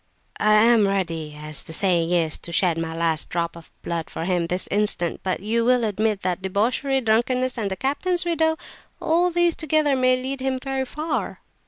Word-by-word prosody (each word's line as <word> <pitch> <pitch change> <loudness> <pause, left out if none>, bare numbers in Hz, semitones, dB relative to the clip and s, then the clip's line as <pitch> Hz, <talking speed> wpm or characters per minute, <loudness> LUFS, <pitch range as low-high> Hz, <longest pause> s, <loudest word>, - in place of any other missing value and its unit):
I 215 0 +4
am 220 -1 +5
ready, 165 -6 -2
as 150 -1 -3
the 160 - -10
saying 170 -2 +1
is, 165 -3 +1
to 170 - -7
shed 175 0 +2
my 165 0 -4
last 165 -2 -1
drop 170 -1 -2
of 165 -1 -13
blood 170 -1 -3
for 165 - -5
him 175 -2 0
this 180 +2 -3
instant; 205 -4 +1
but 185 -1 -2
you 225 +3 0
will 250 0 +3
admit 215 -1 -1
that 180 0 -1
debauchery, 235 +8 0
drunkenness, 250 +3 +1
and 215 -5 -2
the 190 - -3
captain's 345 - 0
widow, 320 -2 +1 0.4
all 345 +3 +2
these 345 -1 +2
together 310 -2 +1
may 255 0 +3
lead 265 +1 -4
him 265 0 -1
very 270 0 -2
far." 305 +5 -4
215 Hz, 190 wpm, -23 LUFS, 170-265 Hz, 0.4 s, am